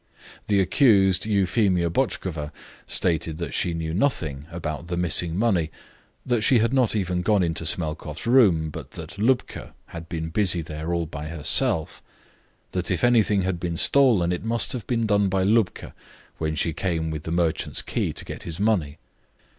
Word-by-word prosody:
The 100 -2 +2
accused, 95 - +3
Euphemia 95 -3 +1
Botchkova, 85 - -2 0.4
stated 80 -2 +1
that 85 - -5
she 85 -2 0
knew 80 -1 -3
nothing 80 - -1
about 80 -1 -5
the 85 0 -3
missing 85 -1 0
money, 95 -8 +1 0.6
that 120 -3 0
she 125 +5 +4
had 115 +3 +1
not 125 -5 +2
even 90 -3 -1
gone 100 +1 +2
into 80 -1 -1
Smelkoff's 75 -2 -2
room, 100 -11 +4
but - - -8
that 100 - -8
Lubka 125 +4 -1
had 85 0 -9
been 80 -1 -4
busy 90 -2 +1
there 80 +1 -5
all 85 -1 0
by 75 -1 -7
herself; 80 0 +1 0.7
that 90 -2 -2
if 90 -3 -1
anything 110 -5 +3
had 90 -2 -2
been 85 -1 -3
stolen, 115 -11 +4
it 90 - -3
must 115 +1 0
have 120 -5 -6
been 115 -2 0
done 100 -2 +2
by 95 0 0
Lubka 105 -2 0 0.5
when 80 -1 -2
she 80 +1 0
came 80 -2 -2
with 75 -1 -4
the 80 - -6
merchant's 85 -2 0
key - - -2
to - - -6
get - - -8
his 85 0 -7
money. 90 -9 0
90 Hz, 170 wpm, -24 LUFS, 80-105 Hz, 0.7 s, she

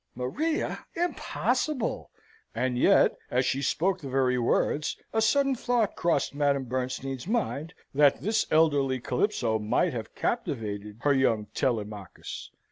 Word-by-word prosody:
"Maria! 300 - -2
Impossible!" 310 -5 -1 0.5
And 130 -1 0
yet, 120 - +4
as 125 +1 +1
she 135 - 0
spoke 170 +7 0
the 140 - -6
very 130 -1 +2
words, 145 +5 +1 0.2
a 220 - +2
sudden 275 +5 +3
thought 240 -4 0
crossed 165 -6 +1
Madame 140 -1 +1
Bernstein's 130 +2 -3
mind, 180 -8 -2 0.2
that 145 0 +4
this 220 +2 0
elderly 145 -5 +3
Calypso 125 - 0
might 110 +5 +1
have 115 -2 -6
captivated 105 -4 -3
her 145 - +3
young 115 -6 +2
Telemachus. 105 -6 -3
135 Hz, 125 wpm, -28 LUFS, 125-185 Hz, 0.5 s, yet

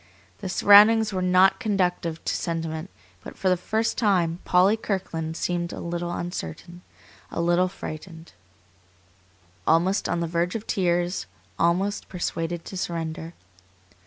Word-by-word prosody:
The 195 - -5
surroundings 210 +3 +6
were 185 - -1
not 185 +1 +4
conducive 180 -5 -1
to - - 0
sentiment, 165 0 -3 0.3
but - - -10
for 190 - +1
the 185 - +4
first 220 +5 -1
time 180 -6 +2
Polly 185 +4 +4
Kirkland 165 -7 -3
seemed 175 -1 -2
a - - -7
little 175 0 -3
uncertain, 175 - -6 0.5
a - - -5
little 175 +2 +3
frightened; 165 -2 -9 1.3
almost 175 +5 +2
on - - 0
the 170 - -1
verge 170 +3 -1
of 225 -1 -4
tears, 175 - 0 0.3
almost 185 +5 +1
persuaded 170 -2 -3
to - - -8
surrender. 165 -1 -4
175 Hz, 130 wpm, -25 LUFS, 170-190 Hz, 1.3 s, surroundings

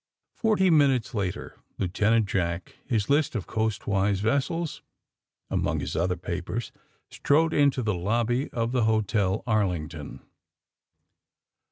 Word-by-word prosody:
Forty 205 -5 +2
minutes 135 -7 +3
later 100 -5 -4 0.2
Lieutenant 105 +4 +2
Jack, 85 -3 -2
his 110 -6 0
list 145 -2 +2
of 105 - -2
coastwise 100 -3 0
vessels 140 - -1 0.7
among - - 0
his - - -4
other 90 +2 0
papers, 90 +6 -4 0.4
strode 160 +3 +2
into 140 -3 +3
the 110 -2 0
lobby 115 +8 0
of 115 0 -2
the 125 -3 +2
Hotel 110 -2 +1
Arlington. 90 - -2
110 Hz, 115 wpm, -26 LUFS, 95-130 Hz, 0.7 s, minutes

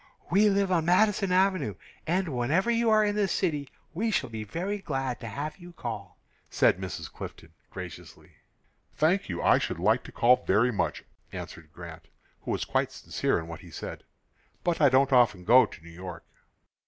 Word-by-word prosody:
"We 205 +4 +5
live 200 -1 +1
on 165 -3 +2
Madison 195 +2 +3
Avenue, 185 - +2 0.3
and 180 +2 +1
whenever 145 - +1
you 230 0 +2
are 215 -1 +5
in 205 0 0
the 205 -1 +2
city 150 -7 -1 0.2
we 220 +7 -1
shall 130 - -1
be 110 -1 -5
very 185 - -3
glad 135 -8 -3
to 115 - -7
have 145 +7 -5
you 175 0 -12
call," 105 - -6 0.3
said - - +3
Mrs. 95 -2 -5
Clifton, 80 0 -9 0.2
graciously. 90 -4 -10 0.6
"Thank 170 - +2
you; 85 -1 -3
I - - +5
should - - -3
like - - +2
to - - -10
call 125 +2 +4
very 110 +6 +3
much," 105 - -2 0.3
answered 80 -2 -9
Grant, 85 -2 -10 0.3
who - - -8
was - - -1
quite - - 0
sincere - - -1
in 80 - -5
what 85 -1 -8
he - - -13
said. - - -7 0.6
"But 175 -2 0
I 145 - +7
don't 135 +1 +3
often 115 -7 +4
go 125 +6 +6
to 80 - -14
New 85 - -12
York." 90 0 -9
140 Hz, 185 wpm, -28 LUFS, -, 0.6 s, I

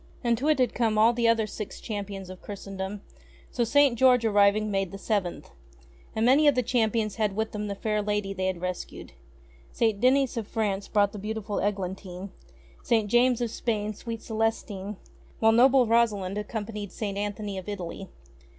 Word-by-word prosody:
And 235 -1 +3
to 285 - -1
it 305 - +4
had 255 -2 +1
come 225 -3 +1
all 225 +2 +5
the 235 -1 +1
other 230 -1 +3
Six 210 -1 -7
Champions 200 -3 -6
of 185 - -11
Christendom; 195 0 -6 0.5
so 240 - 0
St. 275 +2 +4
George 250 -1 +4
arriving 205 0 +3
made 195 -2 -1
the 195 - -7
Seventh. 195 -3 -2 0.6
And 220 +1 +1
many 280 +5 +5
of 290 - +5
the 250 - +1
champions 225 -3 0
had 210 -3 0
with 220 +1 -1
them 210 0 -4
the 200 - -3
fair 210 +1 -1
lady 205 -1 -1
they 185 -1 -2
had 185 -2 -3
rescued. 180 0 -5 0.6
St. 220 -3 0
Denys 260 0 +3
of 220 -3 -3
France 205 -4 -2
brought 205 -1 +1
beautiful 215 -1 -3
Eglantine, 190 -1 -4 0.5
St. 225 -4 +1
James 245 0 +4
of 235 -2 -1
Spain 215 -3 -2
sweet 230 +2 -7
Celestine, 215 -3 -2 0.4
while 225 0 +4
noble 255 +2 +5
Rosalind 215 -5 +2
accompanied 210 -1 -5
St. 200 -1 -4
Anthony 205 -1 -3
of 190 - -9
Italy. 190 -1 -6
210 Hz, 175 wpm, -27 LUFS, 200-230 Hz, 0.6 s, all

